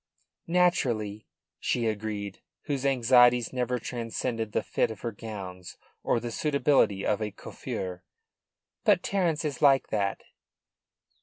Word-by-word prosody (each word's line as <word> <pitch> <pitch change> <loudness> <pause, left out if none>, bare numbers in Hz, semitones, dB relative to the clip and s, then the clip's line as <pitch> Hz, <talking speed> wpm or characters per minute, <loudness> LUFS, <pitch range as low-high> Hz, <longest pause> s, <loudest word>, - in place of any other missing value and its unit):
"Naturally," 125 - +1 0.3
she 120 -2 0
agreed, 105 -2 -3 0.2
whose 140 -2 -1
anxieties 125 -2 +5
never 125 -1 0
transcended 115 -1 -3
the - - 0
fit - - 0
of 110 -2 -8
her 120 - -2
gowns 95 -4 -8 0.2
or - - +1
the 120 0 -5
suitability 140 -8 +2
of 105 - +1
a 105 - -1
coiffure. 90 -2 -6 0.8
"But 175 - +4
Terence 170 -6 0
is 145 -4 -3
like 135 -2 +5
that." 100 -2 -1
115 Hz, 125 wpm, -28 LUFS, 105-135 Hz, 0.8 s, anxieties